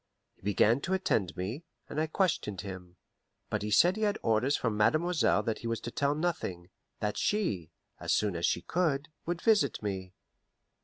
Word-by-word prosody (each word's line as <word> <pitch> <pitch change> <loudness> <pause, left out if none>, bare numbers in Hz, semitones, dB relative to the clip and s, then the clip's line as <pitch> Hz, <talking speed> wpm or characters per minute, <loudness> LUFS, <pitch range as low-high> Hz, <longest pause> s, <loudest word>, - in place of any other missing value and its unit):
He - - -33
began 105 +6 +3
to 190 +4 0
attend 110 - 0
me, 105 - -4 0.2
and 155 - -2
I 160 - 0
questioned 150 - 0
him; 90 -2 -8 0.6
but - - 0
he 105 - -2
said 175 - +5
he - - -4
had 210 -1 +2
orders 115 +5 +2
from 115 -3 -1
mademoiselle 155 +10 +3
that 115 -2 -2
he 115 - -5
was 115 -1 -1
to 120 - -5
tell 140 +3 +1
nothing 95 - -3 0.3
that 105 0 -1
she, 105 - 0 0.3
as - - -2
soon 105 -4 +2
as 85 - +1
she 85 - 0
could, 155 -4 0 0.2
would 175 0 -2
visit 220 - +3
me. 95 -2 -4
115 Hz, 185 wpm, -30 LUFS, -, 0.6 s, said